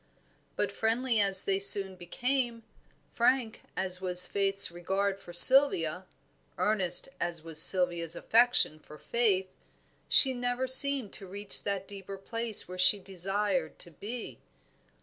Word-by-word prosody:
But - - -5
friendly 230 +1 -3
as 195 -2 +5
they 195 0 -1
soon 195 -1 +2
became, 240 +6 -6 0.5
frank 235 -1 -3 0.2
as 185 -1 -4
was 180 -1 0
Faith's 195 -1 0
regard 195 +3 -6
for 175 - -16
Sylvia, 180 - +6 0.5
earnest 190 -5 +1
as 170 -2 -7
was 160 -1 -1
Sylvia's 175 -2 +1
affection 235 -9 -2
for 150 0 -18
Faith, 195 -5 -4 0.6
she 265 -1 +3
never 245 +1 -5
seemed 260 -3 +6
to 195 - -12
reach 200 +2 -2
that 195 -1 -6
deeper 195 -1 -12
place 230 +2 -5
where 185 +1 -12
she 185 +3 +3
desired 190 -2 -6
to 175 - -10
be. 220 +9 -11
195 Hz, 130 wpm, -26 LUFS, 180-230 Hz, 0.6 s, Sylvia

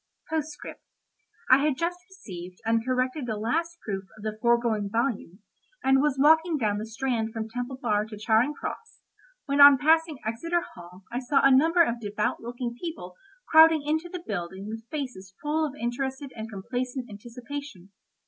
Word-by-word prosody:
P.S.—I 300 -3 -2
had 290 -2 +1
just 350 +1 -2
received 185 - -10
and 225 0 +2
corrected 255 +2 -1
the 220 -2 -2
last 330 +10 -2
proof 195 -2 -4
of 210 - -12
the 215 -1 -3
foregoing 235 -4 +2
volume, 225 -4 -2 0.4
and 270 0 +4
was 295 -2 +1
walking 320 +3 +5
down 210 -5 0
the 215 - -5
Strand 225 -1 -2
from 220 -1 -4
Temple 245 +3 -5
Bar 210 -5 0
to 215 -1 -9
Charing 225 +7 +2
Cross, 455 0 -7 0.4
when 280 0 +2
on 285 -1 +10
passing 320 +1 +3
Exeter 335 +10 -1
Hall 180 +2 -13
I 240 - -2
saw 265 +2 +2
a 275 -1 +7
number 330 +5 +5
of 235 -6 -1
devout 210 0 -1
looking 240 0 -4
people 320 - -6 0.4
crowding 320 -1 +7
into 315 +3 -1
the 355 -1 -7
building 190 0 -5
with 225 +1 -8
faces 250 - -6
full 310 +1 0
of 280 - -9
interested 265 +3 -3
and 220 -1 -6
complacent 245 +5 -4
anticipation. 240 -1 -9
250 Hz, 165 wpm, -27 LUFS, 220-295 Hz, 0.4 s, on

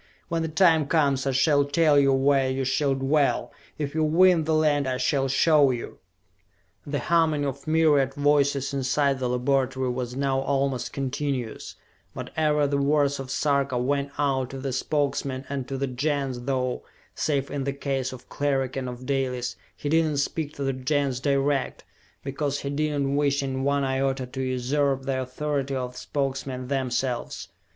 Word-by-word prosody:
When 165 -1 0
the 160 - -1
time 160 -2 +3
comes 140 -4 +2
I - - +2
shall 145 +2 +3
tell 145 0 +3
you 135 -1 +4
where 135 0 +3
you 130 0 -1
shall 135 +1 +1
dwell 140 +2 +1 0.3
if 145 -2 -3
you 160 0 +1
win 165 +1 +4
the 160 - +1
land 150 -3 +2
I 130 -1 -1
shall 135 +1 +1
show 145 +1 +4
you!" 120 -2 -4 0.9
The 145 0 -1
humming 155 +1 +2
of 140 +2 -5
myriad 150 -4 +3
voices 145 -1 +2
inside 140 0 +1
the 125 -1 -1
laboratory 130 +1 0
was 125 0 -4
now 135 0 0
almost 135 -2 -1
continuous, 135 -3 -3 0.4
but - - -6
ever 150 -2 +2
the 140 0 0
words 140 0 +2
of 135 -1 -6
Sarka 140 -2 +1
went 140 +3 0
out 135 -3 0
to 135 - -7
the 135 0 -4
Spokesmen 135 -1 -1
and 135 -2 -3
to 135 - -4
the 140 - -1
Gens, 135 -1 -2
though, 130 -2 -1 0.3
save 140 -2 -1
in 140 -1 -2
the 140 - 0
case 135 -2 -2
of 125 -1 -11
Cleric 135 -3 -1
and 130 -1 -3
of 125 +1 -8
Dalis, 130 -3 -1 0.2
he - - -5
did 160 +2 +3
not 150 -2 -1
speak 150 +1 -2
to 140 - -4
the 135 0 0
Gens 130 0 0
direct, 140 0 0 0.4
because 140 +1 -2
he 140 - -3
did 150 0 0
not 135 - -1
wish 140 0 +1
in 135 -1 -2
one 140 0 +1
iota 135 0 0
to 130 +1 -6
usurp 135 +2 0
the 130 -1 -1
authority 135 +1 -2
of 125 -1 -3
the 125 - -10
Spokesmen 135 -2 -3
themselves. 130 -2 -2
140 Hz, 175 wpm, -25 LUFS, 130-145 Hz, 0.9 s, you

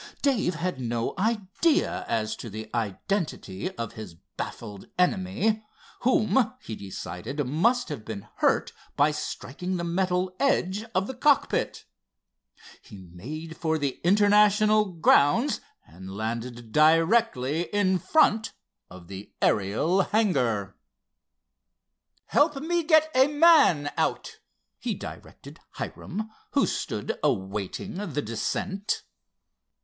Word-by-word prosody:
Dave 225 - +1
had 170 -3 -3
no 120 -1 -2
idea 220 - +1
as 110 -1 -1
to 115 - -7
the 110 +1 -8
identity 115 - -2
of 115 -2 -4
his 110 -7 -9 0.2
baffled 105 -4 -7
enemy, 190 +4 +1 0.4
whom 230 -1 +2
he 110 - -7
decided 100 +8 -5
must 225 - +1
have 140 -8 -5
been 105 -3 -7
hurt - - +1 0.2
by 145 +2 +4
striking 180 +5 -4
the 170 - -3
metal 180 +1 0
edge 205 -7 +1
of 185 +1 +2
the 265 - -5
cockpit. 280 +2 +1 1.0
He 100 - -13 0.2
made 155 - -7
for 160 -1 0
the 140 -3 -3
International 210 +2 +5
grounds 180 - +3 0.2
and 95 +4 -12
landed 115 +1 -5
directly 165 - +3
in 190 -3 +2
font 225 - +2 0.4
of 90 -1 -13
the 95 +2 -9
Ariel 110 - +2
hangar. 125 - 0 1.5
"Help 295 0 +3
me 335 +5 0
get 315 -1 +4
a 260 +1 +5
man 295 - +5
out," - - -1 0.4
he - - -2
directed - - -10
Hiram, 215 +4 -6 0.2
who - - +4
stood - - -3
awaiting 100 - -2 0.2
the 145 +1 -1
descent. 190 - -2
175 Hz, 115 wpm, -26 LUFS, -, 1.5 s, International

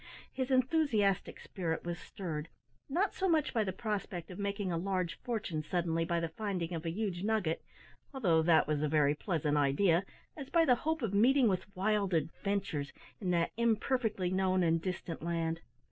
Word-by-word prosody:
His 260 0 -2
enthusiastic 255 - +2
spirit 165 -4 -3
was 175 0 -3
stirred, 165 -5 -5 0.4
not 365 +8 +1
so 380 0 0
much 315 -3 +2
by 225 - +2
the 190 - -2
prospect 195 -3 -4
of 180 - -8
making 200 -1 -2
a - - 0
large 185 -2 -2
fortune 210 -10 -2
suddenly 165 0 0
by 170 0 0
the 165 -1 -2
finding 180 -2 -3
of 165 0 -4
a - - +1
huge 185 -1 -2
nugget 205 -6 0 0.5
although 185 - +2
that 160 0 +5
was 150 0 0
a 150 - +2
very 145 -1 +3
pleasant 150 -2 -1
idea 165 +6 +3 0.3
as 280 -3 -7
by 335 -1 +4
the 255 - +6
hope 315 +4 -1
of 210 -3 -1
meeting 250 +5 +5
with 185 -3 0
wild 200 -1 +1
adventures 165 -1 -2 0.3
in 190 - -2
that 170 -1 +2
imperfectly 225 -4 +1
known 185 -1 +2
and 165 -1 +2
distant 175 -2 -4
land. 165 0 -1
185 Hz, 175 wpm, -33 LUFS, 165-220 Hz, 0.5 s, the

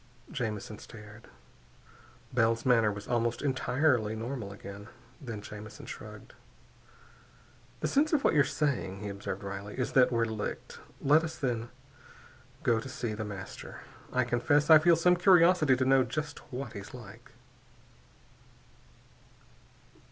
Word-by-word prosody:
Jamison 110 -3 -4
stared. 105 0 -13 1.1
Bell's 115 -1 +2
manner 115 -4 +4
was 100 0 -8
almost 120 0 0
entirely 130 -4 +1
normal 115 -2 -5
again. 100 +1 -10 0.3
Then 115 -6 -6
Jamison 105 +1 -9
shrugged. - - -10 1.5
"The - - +1
sense 295 +3 +2
of 300 -4 +2
what - - +3
you're 145 -3 +5
saying," 130 -10 -2
he 105 - -4
observed 100 -1 -5
wryly, 100 +1 -6
"is 125 - -1
that 130 -1 +5
we're 115 -1 +2
licked. 110 -2 -5 0.2
Let 150 +3 +5
us, 160 - -5
then, 120 -3 -2 0.9
go 115 -1 +3
to 130 - -7
see 120 -3 -4
The 110 +1 -4
Master. 100 -2 -8 0.3
I 130 - +2
confess 145 +6 +2
I 155 - +10
feel 170 +2 +5
some 180 +2 +3
curiosity 175 -5 +5
to 130 +1 0
know 135 0 +5
just 150 +5 -4
what 130 -1 -5
he's 100 +5 -8
like." 120 +2 -13
120 Hz, 135 wpm, -30 LUFS, 105-140 Hz, 1.5 s, I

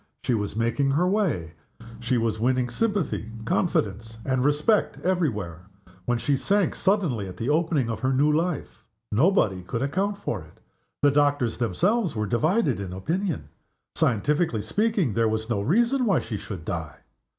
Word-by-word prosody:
She 125 - +1
was 105 -3 -2
making 115 +5 +1
her 150 +6 +2
way; 180 - 0 0.5
she 120 +1 0
was 115 -2 0
winning 125 +1 +1
sympathy, 195 - -1
confidence, 115 - -1
and 130 -1 +1
respect 150 +10 +2
every 180 -3 +2
where 90 -5 -7 0.4
when 120 0 +1
she 140 +4 +1
sank 200 +6 +1
suddenly 170 - 0
at 90 -1 -9
the 115 +7 -2
opening 155 -4 +1
of 115 -2 -3
her 130 0 0
new 145 +3 +3
life. 165 0 -2 0.3
Nobody 110 - +3
could 115 +7 -3
account 195 +8 -1
for 115 - -3
it. 80 0 -17 0.4
The 145 - +6
doctors 145 -5 +1
themselves 185 - +1
were 105 -1 -1
divided 150 - +1
in 95 -2 -5
opinion. 170 - -2 0.4
Scientifically 125 - +1
speaking, 200 - +1
there 115 +1 +2
was 110 +1 -2
no 100 -3 +1
reason 235 - +2
why 195 -5 +3
she 115 - -5
should 95 -4 -7
die. 80 -4 -5
130 Hz, 160 wpm, -25 LUFS, 110-175 Hz, 0.5 s, The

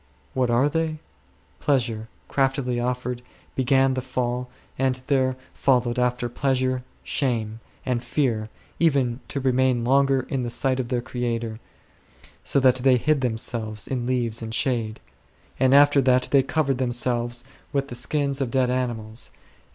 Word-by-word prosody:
What 130 -2 +1
are 120 +4 +3
they? 160 +1 -1 0.6
Pleasure, 115 -6 0 0.2
craftily 135 -2 0
offered, 125 0 -2 0.3
be 130 - 0
gan 135 +1 +3
the 130 - -2
Fall, 125 -1 -2 0.3
and 130 -1 +1
there 130 -2 +2 0.2
followed 125 -2 +2
after 125 0 +1
pleasure 130 0 0 0.2
shame, 115 -5 -1 0.3
and 125 -2 -1
fear, 120 -5 0 0.3
even 135 -7 +2
to 140 - -3
remain 130 -2 +2
longer 135 +1 +3
in 135 0 -3
the 120 - -2
sight 130 +2 +1
of 125 - -2
their 125 -2 0
Creator, 115 -3 -3 0.8
so - - +2
that 130 -1 +5
they 130 0 +4
hid 150 +3 +1
them 120 -3 0
selves 110 -3 -2
in 125 -2 -2
leaves 120 -3 0
and 110 0 -4
shade; 115 -5 0 0.6
and 130 0 +4
after 145 0 +6
that 130 -1 +3
they 140 - +6
covered 135 -1 0
themselves 120 -1 0 0.3
with 140 0 -1
the - - -6
skins 140 +2 -1
of 130 - 0
dead 125 0 +2
animals; 120 -3 -2
and. - - -30
125 Hz, 155 wpm, -24 LUFS, 120-135 Hz, 0.8 s, after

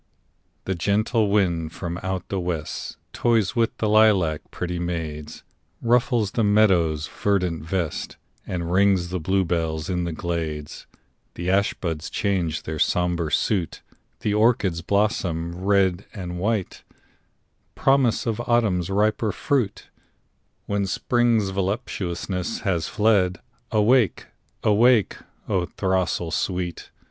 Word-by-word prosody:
The 95 - 0
gentle 105 +4 +1
wind 85 -6 +1
from 85 -1 -5
out 95 -1 -4
the 95 - -1
west 85 -4 -4 0.2
Toys 115 -3 +1
with 115 -1 +1
the 110 - 0
lilac 105 -8 +4
pretty 90 0 -4
maids; 80 -3 -5 0.4
Ruffles 120 -3 +2
the 115 - 0
meadow's 90 -8 +3
verdant 90 -5 -1
vest, 85 -1 -3 0.3
And 85 -2 -3
rings 95 -2 +3
the 90 0 -2
bluebells 85 -3 0
in 90 -1 -1
the 85 - -2
glades; 80 -2 -4 0.5
The 90 +2 -1
ash 100 +1 +2
buds 80 -3 -4
change 90 -6 -1
their 80 0 -5
sombre 85 -2 +1
suit, 95 -7 0 0.4
The 105 - 0
orchards 105 -6 +2
blossom 90 -4 -1
white 95 -1 +2
and 90 -2 -5
red— 105 -3 -1 1.0
Promise 135 -4 +2
of 115 0 -1
Autumn's 105 -7 +2
riper 105 +2 +1
fruit, 125 -5 -1 0.7
When 100 -1 -1
Spring's 115 0 +1
voluptuousness 95 -1 -3
has 85 -6 0
fled. 100 -4 +2 0.3
Awake! 110 -1 +3 0.4
awake, 110 0 +4 0.3
O 95 -4 0
throstle 95 -3 -1
sweet! 90 -2 -2
95 Hz, 115 wpm, -24 LUFS, 85-105 Hz, 1.0 s, lilac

